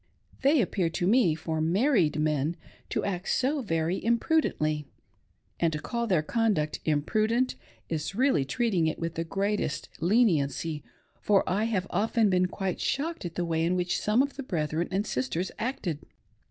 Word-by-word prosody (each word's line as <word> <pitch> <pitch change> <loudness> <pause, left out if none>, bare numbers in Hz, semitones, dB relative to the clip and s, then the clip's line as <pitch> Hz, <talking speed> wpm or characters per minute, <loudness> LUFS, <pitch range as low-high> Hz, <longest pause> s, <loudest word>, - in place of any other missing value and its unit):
They 280 +1 +4
appear 185 -3 0
to 175 +2 -2
me, 200 -5 +4
for 160 0 -3
married 180 - +2
men, 150 +1 +1 0.3
to - - -1
act 185 -1 -3
so 275 +3 +1
very 165 -4 -1
imprudently; 225 - +1 0.7
and 165 -1 +2
to 150 - -2
call 235 +8 -2
their 180 -7 +2
conduct 200 -6 0
' - - -36
imprudent 215 - +1 0.2
' - - -29
is 160 +3 -3
really 255 - +3
treating 190 - +1
it 160 - -1
with 165 -1 -3
the 165 - -2
greatest 195 -2 -2
leniency, 165 - +1 0.4
for 200 -2 +3
I 205 +4 +1
have 200 -5 0
often 215 +2 +2
been 180 0 +3
quite 190 0 -3
shocked 315 - -2
at 170 - -5
the 175 - -1
way 165 -1 0
in 175 +2 +1
which 175 -1 0
some 220 +5 +3
of 280 -1 -5
the - - -3
brethren 160 -5 -1
and 195 +3 -1
sisters 130 - -2
acted. 210 - -2
180 Hz, 170 wpm, -28 LUFS, 160-225 Hz, 0.7 s, They